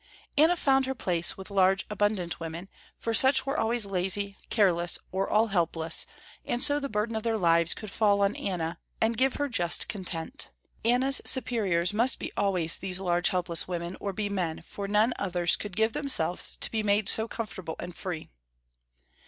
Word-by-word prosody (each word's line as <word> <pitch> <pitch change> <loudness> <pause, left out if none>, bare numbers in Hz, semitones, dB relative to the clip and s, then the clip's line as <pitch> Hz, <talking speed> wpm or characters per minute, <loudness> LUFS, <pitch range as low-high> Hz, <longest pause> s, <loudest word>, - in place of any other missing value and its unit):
Anna 320 +4 +4
found 270 -3 +2
her 265 - -2
place 175 - -1
with 190 +1 -9
large, 195 0 +2
abundant 205 -4 -1
women, 165 +3 -7 0.3
for 230 - -3
such 265 +4 +6
were 275 +1 -2
always 225 0 +1
lazy, 195 +1 -1
careless 175 -5 +2
or 190 +1 -2
all 220 +2 +2
helpless, 165 -3 0 0.4
and 240 +2 -2
so 290 +1 +2
the 280 -1 -4
burden 215 +1 -2
of 220 - -2
their 225 0 -1
lives 170 -3 +2
could 215 -2 -8
fall 205 -2 +2
on 200 +1 +1
Anna, 170 -3 -3 0.2
and 225 +1 +1
give 265 +3 +1
her 290 - -1
just 175 -10 +1
content. 190 - -5 0.3
Anna's 255 +4 +3
superiors 205 -9 +1
must 235 +4 +3
be - - -6
always 180 -5 +3
these 185 -1 0
large 175 -1 +1
helpless 175 -2 0
women, 175 0 -4
or 200 - -3
be 205 +2 -3
men, 180 -6 -3
for 200 +3 -7
none 210 +4 +2
others 175 -3 +1
could 205 -3 -7
give 220 +1 +1
themselves 180 - 0
to - - +3
be 220 - -1
made 205 -1 +1
so 220 +1 +1
comfortable 190 -8 -6
and 175 0 -7
free. 175 - -6
200 Hz, 180 wpm, -27 LUFS, 175-225 Hz, 0.4 s, such